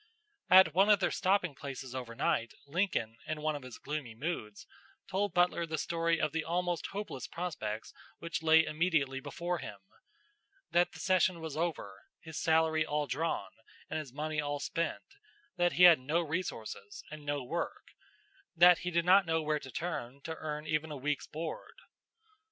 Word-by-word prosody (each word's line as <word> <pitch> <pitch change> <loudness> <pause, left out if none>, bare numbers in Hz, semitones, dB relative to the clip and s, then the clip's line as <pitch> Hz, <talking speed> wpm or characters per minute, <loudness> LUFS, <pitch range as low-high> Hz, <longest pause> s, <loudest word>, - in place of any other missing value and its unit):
At 185 -4 +8
one 195 +4 +4
of 205 -2 +6
their 190 - +1
stopping 185 -4 +1
places 135 -2 -7
over 125 -3 -6
night 115 0 0
Lincoln, 140 - -1
in 155 -1 -4
one 155 -1 +1
of 145 - -6
his 130 -2 -9
gloomy 145 -6 -5
moods, 115 -7 -4 0.4
told 195 +1 0
Butler 175 -1 +2
the 160 0 -2
story 165 +1 0
of 155 - +1
the 165 0 -1
almost 175 0 -1
hopeless 200 -10 -5
prospects 115 -12 -4 0.2
which 170 -1 -4
lay 160 0 +6
immediately 155 -5 +1
before 175 +5 -3
him 105 -6 -7 0.9
that 175 +1 +3
the - - -11
session 185 -2 +2
was 160 -3 -6
over, 155 - -3 0.2
his 160 -2 -7
salary 160 -1 +3
all 150 -1 -1
drawn, 155 +5 -2 0.4
and 160 - -1
his 145 -5 -7
money 150 +2 -2
all 145 0 -2
spent; 165 +3 -2 0.5
that 175 0 +2
he 180 - +4
had 175 -4 +9
no 150 +7 0
resources 145 - -5
and 155 -1 -8
no 145 -1 -2
work; 125 - -4 0.6
that 175 +1 +7
he 180 - -3
did 170 -1 +1
not 190 0 +6
know 160 -1 +1
where 150 0 0
to 135 - -10
turn 140 -4 -4
to 160 - -5
earn 150 -1 -5
even 155 0 -1
a 150 - -5
week's 145 +2 -2
board. 160 - -6
160 Hz, 175 wpm, -32 LUFS, 145-175 Hz, 0.9 s, had